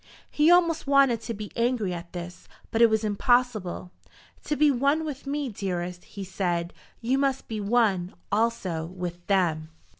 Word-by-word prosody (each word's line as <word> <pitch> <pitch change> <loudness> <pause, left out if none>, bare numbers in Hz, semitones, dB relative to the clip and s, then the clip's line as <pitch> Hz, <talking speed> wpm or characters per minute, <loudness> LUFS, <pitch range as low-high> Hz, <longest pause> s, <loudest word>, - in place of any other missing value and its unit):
He 300 +2 +4
almost 335 -3 +4
wanted 275 -5 +4
to 230 - -4
be 210 0 -7
angry 235 -5 0
at 170 0 -7
this, 175 0 -8 0.2
but 225 - +1
it 235 - +8
was 220 0 +1
impossible. 215 -4 0 0.5
"To 300 - 0
be 295 0 +4
one 280 +5 +1
with 285 -2 -6
me, 285 0 -2
dearest," 180 -5 -4
he 200 - -8
said, 175 -2 -2 0.3
"you 255 +4 +1
must 270 -1 0
be 215 -2 -4
one, 200 -4 +1 0.2
also, 200 -7 0
with 175 -1 -7
them." 165 -5 +1
215 Hz, 160 wpm, -26 LUFS, 180-265 Hz, 0.5 s, it